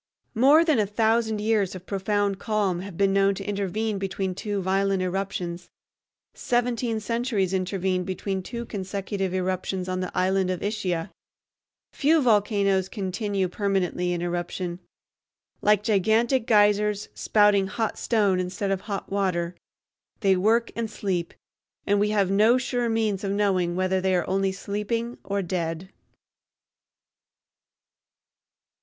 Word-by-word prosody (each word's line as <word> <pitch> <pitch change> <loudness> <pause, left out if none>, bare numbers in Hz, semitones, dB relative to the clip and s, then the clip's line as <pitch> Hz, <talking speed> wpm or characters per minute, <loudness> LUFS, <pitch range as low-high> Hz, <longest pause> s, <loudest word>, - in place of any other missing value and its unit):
More 280 +8 +5
than 310 -8 +3
a 210 - +2
thousand 220 +1 +1
years 210 -4 +1
of 185 0 -9
profound 200 0 -1
calm 205 -5 0
have 190 -2 -8
been 195 -1 +3
known 195 0 +3
to 195 - -6
intervene 205 +1 -2
between 190 -1 -2
two 205 +2 -3
violent 195 0 +1
eruptions. 180 -2 -3 0.6
Seventeen 240 -2 0
centuries 220 -4 -1
intervened 185 -1 -1
between 190 0 -3
two 235 +5 -6
consecutive 195 -1 -3
eruptions 185 0 -2
on 185 0 -2
the 185 -1 -3
island 190 0 +2
of 185 -1 -3
Ischia. 190 -5 -2 0.8
Few 315 +3 +3
volcanoes 200 -6 +2
continue 195 -1 -2
permanently 180 -2 -1
in 175 -1 -2
eruption. 175 0 -3 0.8
Like 210 -1 +3
gigantic 220 +4 +2
geysers, 210 -1 +3
spouting 205 -2 +3
hot 220 +2 -2
stone 205 -5 +2
instead 185 +2 -2
of 190 -1 -1
hot 200 -2 -5
water, 180 -3 0 0.7
they 195 -3 +4
work 225 +5 +2
and 230 -1 -2
sleep, 185 -5 -2 0.5
and 205 0 +2
we 210 +1 +2
have 200 -3 +1
no 215 +5 +5
sure 245 -2 -1
means 220 -3 0
of 195 - -1
knowing 185 -4 +1
whether 185 0 +1
they 190 0 +2
are 175 - 0
only 195 0 +1
sleeping 210 +5 -3
or 200 0 -2
dead. 170 0 -3
195 Hz, 135 wpm, -25 LUFS, 185-215 Hz, 0.8 s, More